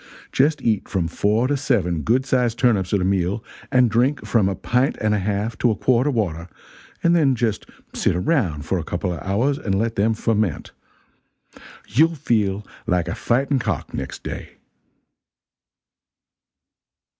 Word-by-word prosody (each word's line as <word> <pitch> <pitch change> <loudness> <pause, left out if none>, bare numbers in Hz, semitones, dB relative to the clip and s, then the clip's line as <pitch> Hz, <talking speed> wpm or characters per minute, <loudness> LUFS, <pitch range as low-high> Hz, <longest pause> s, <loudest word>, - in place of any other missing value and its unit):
Just 145 0 +2
eat 110 -3 0
from 90 -4 0
four 105 +8 +1
to 145 - +1
seven 100 - 0
good 125 - +1
sized 125 -4 +1
turnips 110 -8 +2
at 100 - +2
a - - +1
meal, 95 +2 0 0.3
and 125 -2 +5
drink 125 +6 +1
from 105 -5 +2
a 95 - -2
pint 125 +7 0
and 110 -1 +1
a 105 - +1
half 105 +3 -2
to 120 - +3
a 110 - +1
quart 125 +6 +2
of 145 - 0
water, 85 -6 -2 0.6
and 170 0 +4
then 140 -6 +3
just 115 -3 -1 0.3
sit - - +1
around 90 - 0
a 90 -4 +1
couple 90 +2 -3
of 85 - -6
hours 120 +9 0
and 95 -2 -1
let 115 +2 -1
them 110 +3 +2
ferment. 110 -7 -1 1.2
You'll 160 +9 +3
feel 105 -7 0 0.2
like 90 -1 +1
a - - -2
fighting 135 +3 +1
cock 100 - -3
next - - -6
day." - - -7
110 Hz, 160 wpm, -22 LUFS, 95-125 Hz, 1.2 s, and